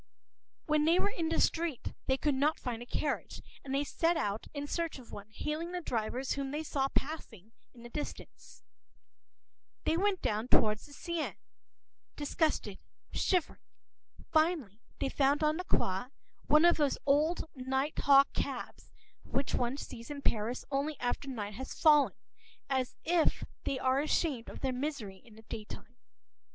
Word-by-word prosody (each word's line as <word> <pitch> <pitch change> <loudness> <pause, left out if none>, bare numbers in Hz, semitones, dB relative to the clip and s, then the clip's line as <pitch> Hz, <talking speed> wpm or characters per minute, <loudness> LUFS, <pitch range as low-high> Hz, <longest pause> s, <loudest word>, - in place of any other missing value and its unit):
When 305 -1 +3
they 335 +2 +5
were 405 - +2
in 330 -4 -1
the 330 - +1
street, 325 -6 +1
they 265 - +3
could 295 +1 +1
not 290 +4 +2
find 240 -3 -4
a 240 - -8
carriage, 295 - -2 0.2
and 270 - -6
they 275 +1 +2
set 330 +4 +1
out 210 -7 -2
in 285 -1 -4
search 335 +1 -2
of 250 -3 -13
one, 205 +1 -8
hailing 310 +9 -3
the 360 - -1
drivers 250 -1 -2
whom 275 -1 -1
they 300 +3 -2
saw 275 -3 0
passing 230 - -4 0.2
in 235 - -13
the 240 - -9
distance. 295 +4 -7 1.2
They 320 - +2
went 395 0 +1
down 215 +3 0
toward 215 -3 +4
the 290 - -14
Seine, 340 +1 -3 0.8
disgusted, 290 - 0 0.3
shivering. 365 -5 +1 0.7
Finally, 310 - +2 0.2
they - - 0
found 280 +2 +2
on 305 +1 +3
the 365 - -4
Quai 190 - +1 0.4
one 305 +3 +6
of 345 - +6
those 290 -3 +2
old 305 +5 +3
night 265 +2 -1
hawk 275 0 +6
cabs - - -4 0.3
which 275 - -1
one 245 +2 0
sees 230 -3 -8
in 285 -1 -6
Paris 225 +3 0
only 280 +2 -1
after 245 +3 -2
night 210 -5 -4
has 260 +5 -7
fallen, 295 -4 +6 0.6
as 260 -1 0
though 340 -1 +4 0.4
they 270 - 0
are 260 +1 +2
ashamed 295 -5 0
of - - -9
their 260 -1 0
misery 250 -8 -3
in 225 -3 -17
the 220 - -14
daytime. 220 +2 -8
275 Hz, 165 wpm, -32 LUFS, 245-310 Hz, 1.2 s, one